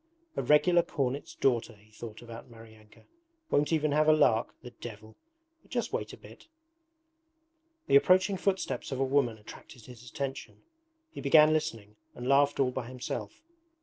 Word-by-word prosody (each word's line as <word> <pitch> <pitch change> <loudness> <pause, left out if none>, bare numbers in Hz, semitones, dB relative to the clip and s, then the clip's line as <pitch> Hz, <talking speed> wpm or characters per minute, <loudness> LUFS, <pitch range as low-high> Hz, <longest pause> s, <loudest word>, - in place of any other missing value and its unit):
'A - - -1
regular 175 +4 +4
cornet's 140 -4 -3
daughter!' 120 -3 0
he 105 +1 -24
thought 110 +1 -10
about 115 0 -11
Maryanka. 110 -2 -17 0.5
'Won't 150 +2 +2
even 155 -2 +1
have 155 +1 +3
a - - +7
lark 125 -7 +2
the 125 - -9
devil! 110 -2 -11 0.5
But - - -27
just - - -3
wait - - -3
a - - -11
bit.' - - -16 1.4
The 140 - +6
approaching 185 +6 +3
footsteps 190 -4 -2
of 135 - -3
a - - +2
woman 130 -4 +1
attracted 110 +2 -14
his 125 -1 -13
attention. 135 -1 -6 0.5
He - - -8
began 155 +2 +6
listening, 115 -10 -3 0.2
and 125 - -6
laughed 140 +1 +3
all 130 -2 +2
by 125 -2 -5
himself. 125 - -6
130 Hz, 160 wpm, -29 LUFS, 115-150 Hz, 1.4 s, a